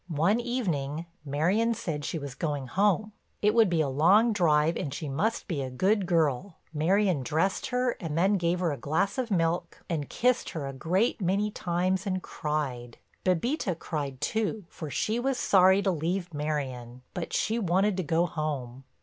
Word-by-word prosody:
One 175 +7 +2
evening 170 - -2 0.2
Marion 180 +11 +1
said 150 -7 -4
she - - -2
was 140 -3 -6
going 145 -1 -2
home; 205 - +1 0.3
it 210 +1 +4
would 225 -4 +5
be 170 -2 +2
a 150 - +1
long 190 - +4
drive 160 -4 +3
and 140 - -3
she 155 - -5
must 180 +12 -1
be 160 -7 -2
a 130 - -3
good 190 +9 +1
girl. 160 0 +1 0.2
Marion 180 +1 +2
dressed 160 +9 0
her 250 -1 +1
and 160 -4 -4
then 190 +4 +3
gave 175 0 0
her 170 -3 +1
a 145 - -3
glass 160 - 0
of 250 -2 -2
milk, 170 -2 -1
and 155 -5 -3
kissed 250 +1 +1
her 155 -4 -4
a 135 - -5
great 185 - 0
many 200 +4 +1
times 185 +1 -1
and 185 -1 -1
cried. 135 -6 -3 0.3
Bébita 185 - 0
cried 140 -6 -4
too, 215 +4 -1
for 155 - -7
she 220 - -1
was 265 +1 0
sorry 190 +1 +5
to 190 - +2
leave 175 +2 -2
Marion, 130 -5 -4
but 175 - -4
she 225 +2 0
wanted 195 +1 +2
to - - +1
go 165 +2 +2
home. 135 -6 -4
170 Hz, 180 wpm, -28 LUFS, 150-200 Hz, 0.3 s, would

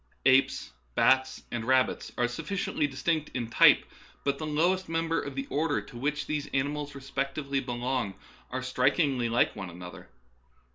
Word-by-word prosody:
Apes, 130 - +3 0.2
bats, 130 0 +3
and 120 -1 -2
rabbits 130 +2 +2
are 120 - +2
sufficiently 150 +4 -2
distinct 150 +3 -1
in 120 -3 -2
type, - - +6 0.4
but 140 -1 0
the 155 - -3
lowest 175 +5 +1
members 165 -1 0
of 140 - -6
the 135 0 -2
orders 150 +1 0
to 120 - -9
which 145 +2 -1
these 150 -1 -2
animals 145 +1 -1
respectively 140 +1 -2
belong 120 -4 -2 0.3
are 130 +1 -3
strik 130 +2 +2
ingly 135 -8 +1
like 120 +1 +2
one 95 -3 -6
another. 90 0 -10
135 Hz, 155 wpm, -29 LUFS, 125-150 Hz, 0.4 s, type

